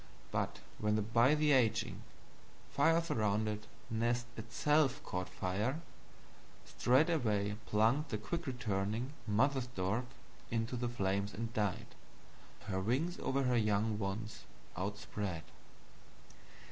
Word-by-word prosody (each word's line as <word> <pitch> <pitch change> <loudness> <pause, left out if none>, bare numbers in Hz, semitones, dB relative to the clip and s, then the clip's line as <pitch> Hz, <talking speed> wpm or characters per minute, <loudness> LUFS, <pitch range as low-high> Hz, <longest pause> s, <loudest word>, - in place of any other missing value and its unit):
But - - -1 0.2
when 105 0 +2
the 110 - +1
bytheraging, 130 +2 +3 0.8
firesurrounded 110 -10 +2 0.3
Nest 120 +2 +1
ITSELF 135 +4 +1
caught 90 0 -3
Fire, 105 - -1 0.9
straightway 120 - +2
plunged 115 +8 +3
the 110 - -1
quickreturning 120 - -2 0.2
Mother 130 +6 +3
Stork 115 -1 -1 0.4
into 115 +2 -1
the 120 0 -1
Flames 100 -2 -1
and 115 +1 -4
died, 105 0 -1 0.7
her 95 -3 -2
Wings 135 - 0
over 135 +1 0
her 125 -1 +2
young 105 0 +2
ones 100 -2 -4 0.3
outspread." 100 -2 -3
115 Hz, 95 wpm, -35 LUFS, 105-130 Hz, 0.9 s, bytheraging